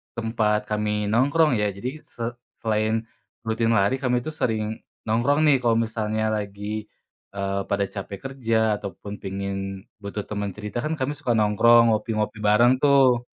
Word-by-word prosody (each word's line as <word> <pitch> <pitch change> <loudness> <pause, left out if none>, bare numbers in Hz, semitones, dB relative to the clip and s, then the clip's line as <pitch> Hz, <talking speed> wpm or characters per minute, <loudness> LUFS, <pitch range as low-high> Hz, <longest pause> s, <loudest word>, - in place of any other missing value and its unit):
tempat 110 -2 +1
kami 105 -1 0
nongkrong, 145 +7 +3
ya. 105 - +1
Jadi 125 +10 -6
se 115 - -9 0.4
selain 110 +1 0 0.4
rutin 115 +1 +1
lari, 105 +4 +3
kami 125 -2 0
itu 155 - -5
sering 110 -5 -1 0.3
nongkrong 120 +7 +2
nih, 145 - +6
kalau 115 -1 +3
misalnya 110 -1 -1
lagi, 105 0 -3 0.5
eee, 100 0 -1
pada 100 0 +2
capek 100 -1 -7
kerja 115 -4 0 0.2
ataupun 100 0 -7
pengin 100 0 -4 0.5
butuh 100 +1 -4
teman 100 -1 -3
cerita, 105 +4 -5
kan 155 - -2
kami 140 +3 -1
suka 125 - -2
nongkrong, 115 +2 +5
ngopi-ngopi 110 0 -2
bareng, 120 +5 +5
tuh. 130 -4 +5
110 Hz, 150 wpm, -24 LUFS, 105-120 Hz, 0.5 s, nih